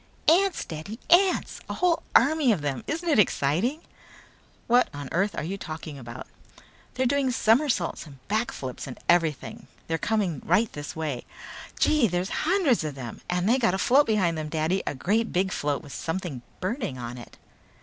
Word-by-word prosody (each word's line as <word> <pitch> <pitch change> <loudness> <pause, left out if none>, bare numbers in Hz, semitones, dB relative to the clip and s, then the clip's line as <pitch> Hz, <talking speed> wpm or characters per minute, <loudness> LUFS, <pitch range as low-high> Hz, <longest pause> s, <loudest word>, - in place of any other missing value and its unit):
"Ants, 370 +3 +4
Daddy, 160 +8 -7
ants! 370 +2 +4
A - - -3
whole 350 -2 +2
army 285 0 +5
of 190 -8 0
them. 135 -4 -2
Ain't 320 +3 -2
it 320 -8 +3
exciting?" 200 - +1 0.8
"What 245 +1 +4
on 145 -2 -6
earth 195 +4 0
are - - -2
you 190 +5 -4
talking 155 -4 -7
about?" 120 0 -8 0.7
"They're 260 +1 +1
doing 275 +1 +2
somersaults 230 - +1
and 135 -3 -16
back 220 +5 0
flips 130 - -6
and 130 - -7
everything! 165 -4 +1 0.2
They're 165 0 -2
coming 200 -10 0
right 205 +6 +2
this 145 -1 -6
way! 150 -6 -3 0.5
Gee, 300 -6 +4
there's 180 +1 -1 0.2
hundreds 340 - +3
of 150 -3 -4
them. 125 -4 -8
And 180 +1 0
they 250 +4 +4
got 225 -6 +2
a - - -1
float 270 +9 +4
behind 185 -7 +1
them, 155 -1 -4
Daddy! 160 +4 0
A - - -1
great 215 - 0
big 190 +1 +1
float 145 -1 -1
with 145 - -10
something 165 -6 -4 0.2
burning 200 - -2
on 120 0 -6
it." 120 - -13
185 Hz, 180 wpm, -26 LUFS, 150-245 Hz, 0.8 s, army